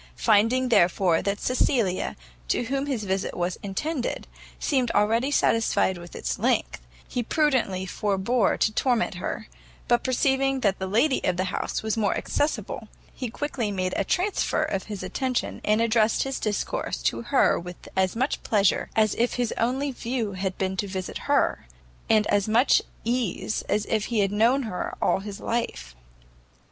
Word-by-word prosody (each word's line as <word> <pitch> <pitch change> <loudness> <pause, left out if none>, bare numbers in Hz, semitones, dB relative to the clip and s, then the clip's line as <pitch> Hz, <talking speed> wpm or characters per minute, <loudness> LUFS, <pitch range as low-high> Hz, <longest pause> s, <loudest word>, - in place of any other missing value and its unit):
Finding, 230 +4 +3
therefore, 175 -4 +3
that 200 +1 -1
Cecilia, 240 -7 +1 0.3
to - - +1
whom 275 +4 -2
his 255 -7 -2
visit 190 -1 -2
was 175 +1 -2
intended, 245 - -3 0.3
seemed 260 -5 +1
already 225 +6 +3
satisfied 225 -8 +2
with 175 0 -11
its - - -3
length, - - 0 0.3
he 245 - -2
prudently 240 - +1
forbore 205 +3 +1
to 215 - +2
torment 240 -2 +1
her; - - -4 0.4
but 240 - +3
perceiving 265 +1 +1
that 200 -4 +1
the 190 - -2
lady 245 +8 +2
of 180 - +1
the 185 - +1
house - - -2
was 220 0 -1
more 200 - +1
accessible, 240 -6 -2 0.3
he 250 - -4
quickly 245 -3 -3
made 185 -2 -2
a - - +1
transfer 370 - 0
of 195 - -2
his 205 -3 -6
attention, 250 +7 -2
and 215 +1 +2
addressed 225 -1 +3
his 270 0 -3
discourse 210 -2 -2
to - - 0
her 260 +3 +3
with 180 0 -10
as 190 +1 +1
much 260 +5 -1
pleasure 200 -3 +2
as 215 -2 +3
if 240 +1 +1
his 245 -3 -1
only 265 +4 0
view 240 -3 -3
had 190 0 -3
been 190 0 -1
to 200 +1 -2
see 185 -1 -4
her, - - +1 0.4
and 215 -1 +4
as 205 -1 +1
much 235 +5 +4 0.2
ease 230 -3 -1
as 210 +1 +1
if 215 -2 0
he 230 -3 +1
had 195 -1 +1
known 235 +6 +3
her 215 -6 -4
all - - +2
his 200 0 -7
life. 65 - -3
220 Hz, 165 wpm, -25 LUFS, 195-250 Hz, 0.4 s, and